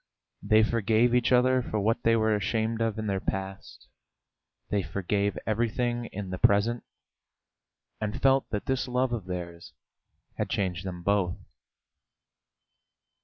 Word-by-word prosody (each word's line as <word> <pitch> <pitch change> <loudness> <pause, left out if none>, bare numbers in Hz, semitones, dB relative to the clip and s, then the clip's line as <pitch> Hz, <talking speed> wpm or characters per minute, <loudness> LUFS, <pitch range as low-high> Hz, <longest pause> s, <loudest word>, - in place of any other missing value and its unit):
They 110 0 +4
forgave 115 +2 +2
each 125 0 +2
other 130 +1 +4
for 110 -2 -3
what 110 +3 +1
they 115 0 +3
were 110 -1 +2
ashamed 110 +3 -1
of 115 -1 0
in 110 - -3
their 100 -2 -1
past, 95 0 -5 0.8
they 100 - +2
forgave 100 +4 -1
everything 120 +2 -1
in 100 -4 -6
the 95 - -4
present, 110 +4 +3 1.2
and 105 -1 -3
felt 135 0 +3
that 105 -2 -3
this 130 0 -1
love 125 0 0
of 110 -6 -3
theirs 85 -2 -6 0.7
had - - -1
changed 95 -1 -2
them 90 -2 -6
both. 100 -2 +1
110 Hz, 135 wpm, -28 LUFS, 95-120 Hz, 1.2 s, They